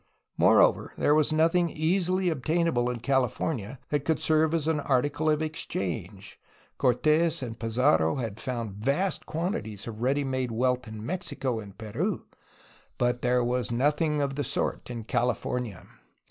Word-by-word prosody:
Moreover, - - +4
there 145 - +3
was 155 -1 +3
nothing 165 +2 +3
easily 180 +3 +1
obtainable 155 -3 +1
in 120 -2 -4
CaUfomia 130 -1 -1
that 145 -2 0
could 160 +2 +1
serve 155 0 +3
as 160 -2 0
an 160 -2 +1
article 145 +3 +1
of 155 0 +2
ex 155 0 -3
6 - - -8
A - - +1
HISTORY 95 - 0
OF - - 0
CALIFORNIA 90 - -12
change. 95 - -13 0.4
Cortes 155 +5 +2
and 115 -2 -6
Pizarro 110 -9 +2
had 115 -5 -4
found 120 -4 -3
vast 150 +8 0
quantities 135 - -3
of 115 -1 -7
ready 140 +3 +1
made 130 -2 -1
wealth 125 +2 0
in 110 0 -7
Mexico 155 -8 -2
and 100 -2 -10
Peru, 110 -2 -3 0.7
but 120 0 +1
there 125 0 +2
was 120 -2 0
nothing 150 +4 +1
of 140 -1 -1
the 145 +1 -2
sort 140 -1 -2
in 120 -2 -5
CaUfomia. 120 -1 -2
130 Hz, 170 wpm, -27 LUFS, 120-155 Hz, 0.7 s, Moreover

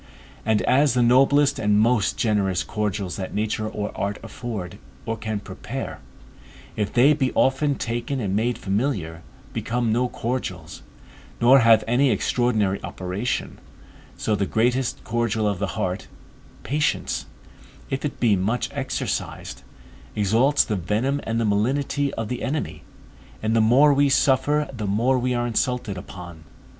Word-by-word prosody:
And 110 -1 +2
as 135 0 +3
the 125 - +3
noblest 135 +3 +4
and 105 -2 +3
most 110 -1 +2
generous 100 -5 +1
cordials 105 -3 -3
that 95 -2 -5
nature 110 0 -1
or 105 -1 -5
art 100 +1 -2
afford, 100 -6 -6 0.3
or 115 0 -2
can 110 -1 -3
prepare, 100 - -6 0.8
if 105 -1 -1
they 135 +5 +5
be 135 -3 0
often 140 +2 +2
taken 120 +3 -3
and 100 -4 -1
made 120 +3 0
familiar, 95 - -2 0.3
become 120 -1 -1
no 125 +3 +1
cordials, 95 -11 -4 0.6
nor 130 +3 +7
have 115 -2 +5
any 130 +4 +3
extraordinary 110 -7 +1
operation, 95 +6 -3 0.6
so 110 - -1
the 100 -1 0
greatest 120 +4 0
cordial 115 -2 0
of 100 -3 -1
the 100 -1 -3
heart, 95 -3 -2 0.6
patience, 150 +3 -1 0.6
if 135 - -2
it 150 - -4
be 115 -4 +4
much 105 +5 -1
exercised, - - -4 0.5
exalts 115 +8 +3
the 105 - -2
venom 110 - -1
and 115 +1 -1
the 115 - +1
malignity 135 +7 0
of 115 - -3
the 125 +2 -4
enemy, 150 +3 -3 0.6
and 110 +1 +1
the 115 - +4
more 135 +7 +5
we 140 0 +3
suffer 145 +3 +2
the 110 -4 -4
more 120 +6 +2
we 125 0 0
are 120 0 0
insulted 120 -2 -1
upon. 90 -2 -9
115 Hz, 145 wpm, -23 LUFS, 105-130 Hz, 0.8 s, nor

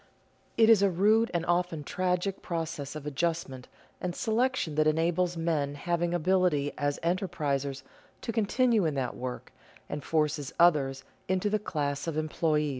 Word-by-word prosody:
It 225 -1 +6
is 225 -3 +7
a 200 - +4
rude 215 +6 +3
and 170 -1 -1
often 175 -3 0
tragic 185 +4 -1
process 160 -4 -4
of 150 -2 -7
adjustment 150 -3 -2 0.3
and 180 -1 -3
selection 240 -6 0
that 155 +1 +2
enables 170 +3 +1
men 155 -4 -1
having 170 +2 -1
ability 175 -4 +1
as 145 -1 -1
enterprisers 145 -6 -1 0.4
to 235 - -3
continue 225 0 +2
in 155 -3 0
that 130 -3 -2
work, 125 0 -6 0.4
and 145 -1 -5
forces 150 -2 -1
others 140 -6 +3 0.2
into 190 +2 0
the 215 - +2
class 145 -6 -2
of 160 -2 -2
employees. 155 -1 0
165 Hz, 150 wpm, -29 LUFS, 145-185 Hz, 0.4 s, is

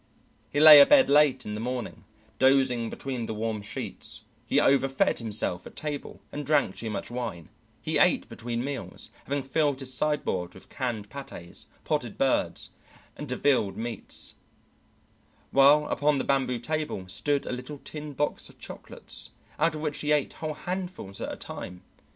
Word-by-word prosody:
He 145 - -1
lay 150 -1 +11
abed 265 - +7
late 140 -3 +4
in 105 - -4
the 105 - -4
morning, 125 0 -4 0.3
dozing 130 -3 +3
between 125 -4 -4
the 110 - -4
warm 110 -1 -2
sheets; 100 - -5 0.2
he - - +3
overfed 135 -1 +3
himself 105 -5 0
at - - -13
table, 150 -2 -5
and 145 - -4
drank 145 -10 +2
too 115 - -5
much 105 - -4
wine; 120 -9 -5 0.3
he - - +1
ate - - +4
between 120 0 -4
meals, 135 -2 -5
having 140 0 -1
filled 145 0 +1
his 130 -1 -5
sideboard 125 -12 -1
with 95 - -14
canned 115 -6 -4
patés, 110 -11 -9 0.2
potted - - -2
birds, - - 0 0.4
and 150 - -7
devilled 125 -6 +1
meats; 115 -2 -5 1.2
while 145 +2 +6
upon 145 0 +2
the - - 0
bamboo 135 -2 +1
table 150 -7 -3
stood 140 +9 0
a 125 0 -3
tin 150 +2 -8
box 145 +2 -2
of - - -18
chocolates - - -8 0.3
out 160 +1 +2
of 155 - -5
which 150 -2 -2
he 150 - 0
ate 150 -2 +2
whole 155 -1 -4
handfuls 180 - -5
at - - -3
a - - -5
time. 90 0 -8
135 Hz, 160 wpm, -27 LUFS, 115-150 Hz, 1.2 s, lay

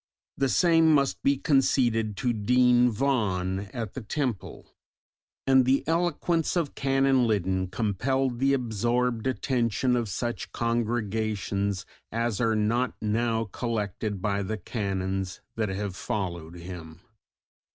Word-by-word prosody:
The 135 - +1
same 165 +1 +4
must 140 -1 +1
be 140 0 +2
conceded 120 -7 +2
to 120 +1 0
Dean 125 +3 +4
Vaughan 100 -6 -1
at 115 -5 -5
the 130 - -5
Temple; 120 -1 -4 0.7
and 130 -1 +5
the 130 +2 +2
eloquence 165 0 0
of 165 -5 -1
Canon 135 -2 +2
Liddon 95 -3 0
compelled 120 +7 -1
the 135 +1 +3
absorbed 120 0 0
attention 125 -2 0
of 120 -3 -1
such 120 +5 -3
congregations 110 -4 -1 0.3
as 115 -2 -1
are 115 -2 +2
not 115 +4 +1
now 115 +1 0
collected 105 -4 -3
by 100 -1 0
the 105 +3 -3
Canons 95 -4 -3 0.2
that 110 -2 -1
have 95 0 -3
followed 85 -5 -4
him. 85 -2 -9
115 Hz, 120 wpm, -27 LUFS, 100-130 Hz, 0.7 s, and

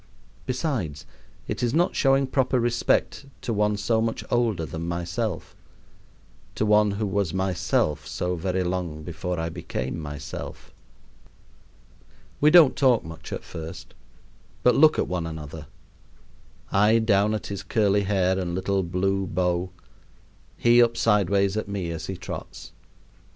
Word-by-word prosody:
Besides, 125 - -2 0.4
it - - -3
is 120 +2 0
not 175 +2 +2
showing 135 0 +3
proper 130 -1 +1
respect 120 +3 0
to 115 - -2
one 105 0 +1
so 110 +2 +1
much 115 0 -2
older 115 -9 +1
than 80 +4 -5
myself 85 +3 -3 1.0
to 110 - 0
one 105 0 +4
who 110 - -1
was 100 -3 -1
myself 90 -5 0
so 90 +3 -2
very 90 +2 -1
long 90 -4 -3
before 90 +2 -4
I 80 0 -2
became 65 -1 -4
myself. 75 0 -7 1.7
We 150 - +5
don't 160 -4 +7
talk 130 -4 +3
much 80 0 -10
at - - -5
first, 80 0 -8 0.7
but 125 - +5
look 155 +1 +6
at - - 0
one 90 -2 -2
another; 80 -1 -8 1.0
I 105 +3 +4
down 105 -1 +2
at 110 - -5
his 100 - -5
curly 100 +1 +2
hair 95 -2 +1
and 85 -2 -3
little 95 +1 0
blue 95 +2 -1
bow, 90 +1 0 0.9
he 120 0 +5
up 115 -1 +3
sideways 100 -2 +2
at 110 - -2
me 95 -4 -3
as 80 - -5
he - - -4
trots. - - -8
95 Hz, 140 wpm, -25 LUFS, 85-115 Hz, 1.7 s, don't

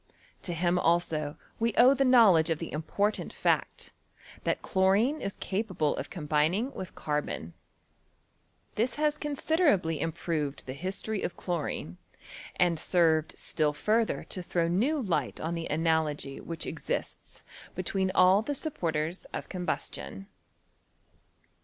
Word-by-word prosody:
To 175 - -3
him 175 +2 +2
also 165 -4 +1 0.2
we 230 -1 +1
owe 250 +3 +8
the 275 0 +2
knowledge 215 -11 +6
of 165 - +1
the 165 - -6
important 200 +7 -1
fact, - - -1 0.5
that - - 0
chlorine 200 +10 +2
is 200 - -3
capable 190 -7 -1
of - - -5
combining 165 - 0
with 185 - -7
carbon. 150 - -3 1.2
This 235 +4 0
has 300 0 +1
con 295 -1 -4
siderably 270 - +2
improved 155 -3 -2
the 130 - -5
history 195 +7 -4
of - - -3
chlorine 155 - -3 0.6
and 175 -3 +2
served 160 -3 +2
still 150 -1 0
further 220 +8 +1
to 185 - -4
throw 170 -1 0
new 240 - +1
light 165 - -1
on 165 +2 -2
the 165 -1 -3
analogy 155 -3 0
which 165 -1 -5
exists - - -5 0.3
between 190 -1 0
all 185 +2 +6
the 290 +6 -3
supporters 170 - -2
of - - -5
combustion. 95 - -4
175 Hz, 130 wpm, -29 LUFS, 155-215 Hz, 1.2 s, owe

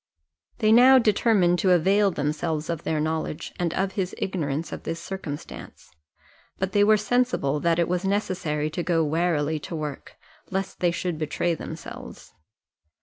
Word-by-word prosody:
They 215 -2 +3
now 255 +3 +8
determined 205 -6 +3
to 190 - +2
avail 195 +4 +3
themselves 155 0 -2
of 165 -2 -4
their 155 -2 -1
knowledge, 155 0 -3
and 175 -2 0
of 195 0 0
his 190 -2 -3
ignorance 160 -4 -3
of - - -6
this 165 - -4
circumstance: 165 -7 -8 0.7
but 190 0 -2
they 205 +1 +4
were 215 +1 +5
sensible 215 - 0
that 165 +1 +1
it 170 - +2
was 180 +1 -1
necessary 180 -6 -1
to 165 - -3
go 165 -2 +1
warily 155 -1 0
to 165 - -7
work, 150 -3 -6 0.3
lest 190 0 -3
they 175 - +3
should 170 -1 -3
betray 160 +2 -1
themselves. 160 0 -9
175 Hz, 155 wpm, -25 LUFS, 155-195 Hz, 0.7 s, now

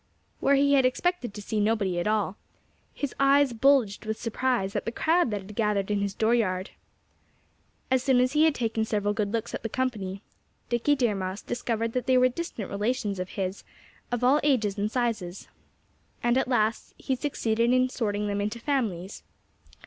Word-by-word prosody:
Where 280 - +3
he 280 +1 +3
had 270 -2 +5
expected 255 - 0
to 210 - -7
see 215 +1 -2
nobody 205 -4 +1
at 175 - -1
all, 210 -2 0 0.6
his 285 -3 -4
eyes 275 -1 +4
bulged 240 -4 +3
with 220 0 -2
surprise 230 -4 -1
at - - -1
the 230 - -2
crowd 325 +3 +2
that 205 -2 -2
had 205 +2 -11
gathered 210 -2 0
in 205 -1 +1
his 200 -1 -2
dooryard. 220 -5 +1 1.2
As 260 -1 +3
soon 260 -1 +3
as 250 +1 +3
he 305 +1 +5
had 315 -3 +3
taken 225 -2 -1
several 205 -2 0
good 205 -1 -1
looks 230 0 -3
at - - -4
the 225 - -4
company, 210 -6 -3 0.5
Dickie 240 +5 +2
Deer 240 -6 +1
Mouse 190 0 -4
discovered 230 -1 -2
that 250 0 -2
they 260 -1 +4
were 255 0 +5
distant 250 - -6
relations 205 -1 -1
of 185 0 -4
his, 190 0 -3 0.5
of 245 0 -1
all 270 +4 +5
ages 230 -9 +1
and 210 +1 -2
sizes. 225 -8 -2 0.8
And 240 0 +3
at 265 - +1
last 225 -3 0
he 265 - -2
succeeded 235 -4 0
in 255 0 +4
sorting 210 -5 -2
them 205 0 -1
into 210 +3 -3
families. 220 - -2
230 Hz, 185 wpm, -27 LUFS, 205-255 Hz, 1.2 s, had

